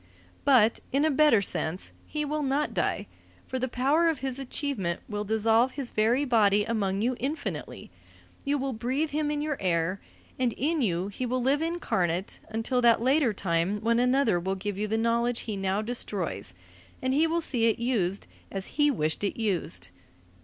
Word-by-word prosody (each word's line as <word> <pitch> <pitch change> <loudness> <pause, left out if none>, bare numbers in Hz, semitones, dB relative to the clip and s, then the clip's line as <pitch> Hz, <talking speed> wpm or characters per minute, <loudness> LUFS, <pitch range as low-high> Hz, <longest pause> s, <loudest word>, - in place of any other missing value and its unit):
But, 235 -5 +5
in 280 +3 +2
a 315 - +3
better 275 -8 +5
sense, 180 -1 -2
he 300 -1 -2
will 300 +1 -2
not 285 +1 0
die, - - -1 0.4
for 260 - -3
the 260 - 0
power 280 +7 +2
of 320 - 0
his 265 -1 -3
achievement 255 - -2
will 210 -1 -3
dissolve 225 +4 +2
his 270 -4 -3
very 235 +6 +2
body 210 -5 +3
among 205 -3 -1
you 250 +2 +1
infinitely; 285 +6 -4 0.5
you 285 +1 +1
will 270 -1 -2
breathe 260 +7 -1
him 300 0 0
in 295 0 -1
your 300 -2 -2
air; 180 +1 0 0.4
and 250 -3 +1
in 310 +6 0
you 185 -4 0
he 245 +5 -4
will 250 +1 -1
live 280 +4 +2
incarnate 190 - -1
until 225 +3 0
that 235 -1 +5
later 260 +1 +3
time 185 0 0
when 230 +1 +2
another 250 -6 +3
will 190 +2 -2
give 205 +1 -4
you 210 +2 -2
the 220 +1 0
knowledge 235 +1 +1
he 215 - -4
now 195 +2 -1
destroys, 240 +2 -3 0.4
and 260 0 0
he 310 +4 +3
will 335 +1 +1
see 240 -7 +2
it 225 - +2
used 210 -6 0 0.3
as 195 +9 -6
he 295 - +6
wished 160 - -1
it 200 - -2
used. 165 - -2
235 Hz, 180 wpm, -28 LUFS, 200-275 Hz, 0.5 s, he